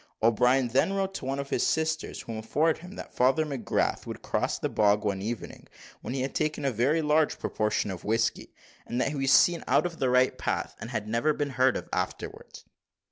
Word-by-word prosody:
O'Brien 125 +3 +3
then 135 +11 +2
wrote 195 -1 -1
to 130 - -6
one 135 +1 -2
of 140 0 -5
his - - +1
sisters, 160 0 -1
who - - -8
informed 145 +9 0
him, 180 +3 -11
that - - -9
Father 135 +5 +3
McGrath 135 -8 -1
would - - -7
cross - - -1
the - - -1
bog 105 0 +2
one 95 -2 -1
evening 115 +3 -6 0.3
when 125 - -5
he 135 - -1
had 135 - -3
taken 155 -2 -1
a 135 - +2
very 135 +8 +1
large 150 +1 +2
proportion 105 -1 -1
of 90 - -7
whisky; 115 +2 0 0.4
and 120 - -2
that 130 - +1
he 150 - -4
was 135 -1 +1
seen 170 +3 +5
out - - +3
of 170 -2 -4
the 130 - +1
right 125 +1 +3
path, - - -2
and 115 - -7
had 110 -3 -3
never 115 +8 +1
been 145 -1 -2
heard 130 0 +3
of - - -7
afterwards. - - -5
130 Hz, 215 wpm, -28 LUFS, 115-155 Hz, 0.4 s, seen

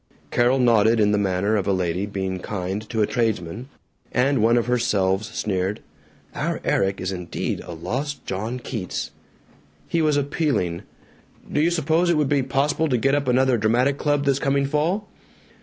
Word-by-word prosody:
Carol 120 +2 +3
nodded 115 -2 +4
in 105 -1 +4
the 105 - +2
manner 100 +2 +1
of 100 -2 -1
a - - +3
lady 90 +1 -1
being 95 -2 -3
kind 95 +1 -3
to 110 -3 +1
a - - +4
tradesman, 115 0 -2 0.4
and 135 0 +2
one 115 +2 +4
of 120 - +1
her 125 0 +1
selves 100 -2 +1
sneered, 95 0 -2 0.5
"Our - - -2
Erik 95 0 +1
is 90 +1 -2
indeed 90 -2 -3
a 90 - -8
lost 130 - -4
John 110 +6 -3
Keats." 115 -6 -5 0.8
He 165 - 0
was 150 -2 +2
appealing, 140 - 0 0.7
"Do 150 - +2
you 165 - +3
suppose 165 +1 +1
it 170 - +3
would 150 -3 +1
be 145 -1 +3
possible 140 +4 0
to 125 - +2
get 135 +4 +1
up 145 -1 +1
another 130 -1 +3
dramatic 125 +6 +2
club 145 -1 +1
this 140 -1 +2
coming 140 0 +1
fall?" 165 +9 0
120 Hz, 175 wpm, -23 LUFS, 100-140 Hz, 0.8 s, nodded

